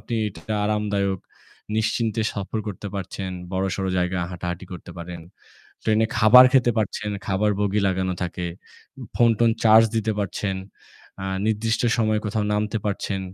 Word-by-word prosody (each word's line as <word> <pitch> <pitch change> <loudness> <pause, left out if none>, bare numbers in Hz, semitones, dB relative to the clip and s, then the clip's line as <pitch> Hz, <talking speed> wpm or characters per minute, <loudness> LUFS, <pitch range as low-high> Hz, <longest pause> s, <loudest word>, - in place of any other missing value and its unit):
আপনি 120 - -5
এটা 100 +3 -6
আরামদায়ক 100 -2 0 0.6
নিশ্চিন্তে 110 0 0
সফর 100 +2 -4
করতে 105 0 -5
পারছেন। 95 0 -4 0.2
বড়সড় 95 0 -1
জায়গায় 90 0 0
হাঁটাহাঁটি 90 +1 -5
করতে 90 -1 -9
পারেন। 85 0 -7 0.6
ট্রেন 110 -1 +2
এ - - +1
খাবার 125 +4 +9
খেতে 130 -3 +4
পারছেন, 105 0 -2 0.2
খাবার 100 +2 +1
বগি 105 0 +1
লাগানো 95 -1 0
থাকে। 90 0 -3 0.7
ফোন-টোন 115 0 +4
চার্জ 110 0 +7
দিতে 110 0 +1
পারছেন। 100 -1 -2 0.7
আ - - -3 0.2
নির্দিষ্ট 110 +1 0 0.2
সময়ে 110 -1 +2
কোথাও 105 +1 -1
নামতে 105 +1 0
পারছেন। 100 -1 -2
105 Hz, 140 wpm, -23 LUFS, 95-110 Hz, 0.7 s, খাবার